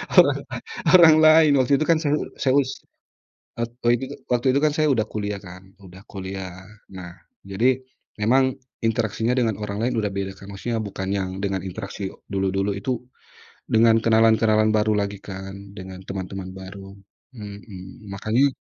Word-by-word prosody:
orang - - +6 0.6
orang 170 -4 +9
lain. 155 -1 +7
Waktu 130 +2 +2
itu 155 - +2
kan 165 - +5
saya 145 - +1 0.2
saya 130 -1 +1
us 130 -1 -4 0.9
et 115 0 -2
tadi 120 0 +4
juga. 140 +2 -8 0.2
Waktu 125 +2 +1
itu 140 - +3
kan - - +5
saya 155 -1 +3
udah 110 -4 +1
kuliah 105 -1 -3
kan, 90 -1 -11 0.2
udah 95 0 -13
kuliah 95 -1 -6 0.5
nah, 90 -2 -8 0.3
jadi 120 +7 +1 0.4
memang 130 +4 +3 0.3
interaksinya 115 +1 0
dengan 115 -4 +1
orang 100 -1 -4
lain 125 +2 0
udah 105 -2 -1
beda 95 0 -3
kan, 100 - -12
maksudnya 115 +4 -3
bukan 95 -2 -4
yang 95 -1 -2
dengan 100 -1 -1
interaksi 100 +1 -5 0.2
dulu-dulu 95 +1 0
itu, 130 +6 -2 0.8
dengan 115 0 +5
kenalan-kenalan 110 -1 +4
baru 110 0 +2
lagi 100 0 -3
kan, 95 0 -7 0.2
dengan 95 -1 -8
teman-teman 95 0 -5
baru, 95 +1 -10 0.4
mhm, 105 0 -10
makanya 120 +7 +2
105 Hz, 155 wpm, -23 LUFS, 95-120 Hz, 0.9 s, orang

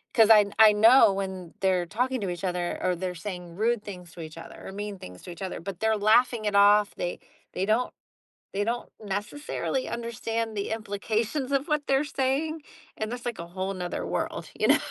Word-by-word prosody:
'cause 225 -2 +6
I 210 -2 +8
I 215 -1 +9
know 225 0 +7
when 190 -3 -5
they're 185 -2 +2
talking 250 +6 -1
to 195 - -2
each 175 +1 -6
other 180 -1 -1
or 180 -1 +1
they're 180 +1 -3
saying 175 -1 -7
rude 225 +1 +1
things 180 -4 -9
to 170 - -9
each 155 0 -8
other - - -10
or - - -6
mean 205 0 -5
things 90 0 -10
to - - -9
each 175 - -11
other, 190 - -4
but 180 +1 -7
they're 220 0 +2
laughing 220 +2 +3
it 205 -1 0
off, 205 +1 +5
they 175 - -3 0.3
they 190 - -1
don't 230 +4 +1 0.6
they 205 +1 0
don't 240 +1 -3
necessarily 220 +6 -3
understand 230 -1 -3
the 200 -1 -2
implications 225 +5 -2
of 275 +3 +1
what 300 -1 0
they're 270 +2 +3
saying, 290 +3 -1 0.4
and 215 +1 -3
that's 245 0 -6
like, 240 -2 -3
a 170 - -6
whole 190 +2 -3
'nother 180 -1 -4
world, - - -3
you - - +3
know? - - +6
210 Hz, 205 wpm, -27 LUFS, 185-235 Hz, 0.6 s, I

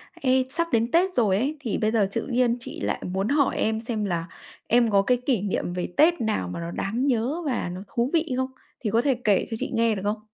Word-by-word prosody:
Ê, 260 -1 +2
sắp 335 +5 -1
đến 230 0 +1
Tết 365 +3 +3
rồi 215 - +3
ấy, 280 +8 -1
thì 240 -7 -2
bây 215 0 +1
giờ 215 -4 +2
tự 230 - -2
nhiên 245 -2 +2
chị 235 - -8
lại - - -1
muốn 190 +2 -1
hỏi 285 +2 +2
em 220 0 0
xem 225 -2 -2
là 170 -4 -1 0.4
em 235 -1 +4
có 200 -1 +5
cái 250 +5 +2
kỷ 245 -8 +2
niệm 195 -3 -2
về 180 0 -4
Tết 325 0 +4
nào 215 - -1
mà 90 - -5
nó 170 0 -5
đáng 230 +10 -1
nhớ 260 +6 0
và 245 -10 -1
nó 185 +2 -7
thú 235 +2 +1
vị 325 -4 +1
không? 260 0 -1 0.3
Thì 220 - -2
có 225 +3 +3
thể 270 0 +2
kể 205 -3 +3
cho 225 - -2
chị - - -3
nghe 230 -1 +2
được 195 - -4
không? 210 +1 0
230 Hz, 255 wpm, -25 LUFS, 205-260 Hz, 0.4 s, có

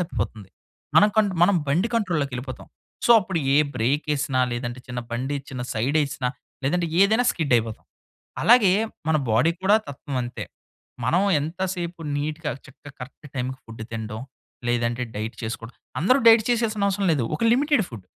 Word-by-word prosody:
తప్పిపోతుంది. 110 - -4 0.5
మనం 210 - +7
కన్ 215 -2 +4
మనం 185 +1 +5
బండి 175 +11 +2
కంట్రోల్‌లోకెళ్ళిపోతాం. 140 - -2 0.4
సో, - - +2
అప్పుడు 185 -2 -2 0.2
ఏ - - +5 0.2
బ్రేకెసినా 140 +1 0
లేదంటే 120 +1 -4
చిన్న 125 0 -4
బండిచ్చిన, 130 +2 -4
సైడేసినా 140 +2 0 0.4
లేదంటే 170 +4 +1
ఏదైనా 220 +5 +4
స్కిడైపోతాం. 120 -8 0 0.6
అలాగే 225 -5 +6 0.4
మన 160 - +4
బాడీ 125 +9 +4
కూడా 195 +2 +4
తత్వం 140 0 -6
అంతే. 120 0 -5 0.6
మనం 170 +10 +3 0.2
ఎంత 160 +5 -5
సేపు 175 -1 -5 0.2
నీట్‌గా, 150 +1 -3
చక్కగా, 140 +1 -14
కరెక్ట్ 130 +3 -10
టైంకి 130 0 -3
ఫుడ్ 115 -1 -9
తినడం 110 0 -5 0.5
లేదంటే 120 +1 0
డైట్ 110 +3 -4
చేసుకోవడం 115 +1 -6 0.3
అందరూ 255 - +4
డైట్ 225 -1 +8
చేసేయాల్సిన 225 -4 +1
అవసరం 195 0 0
లేదు. 135 -6 0
ఒక 155 - -4
లిమిటెడ్ 280 -4 +3
ఫుడ్ 110 -6 -10
145 Hz, 140 wpm, -24 LUFS, 125-185 Hz, 0.6 s, డైట్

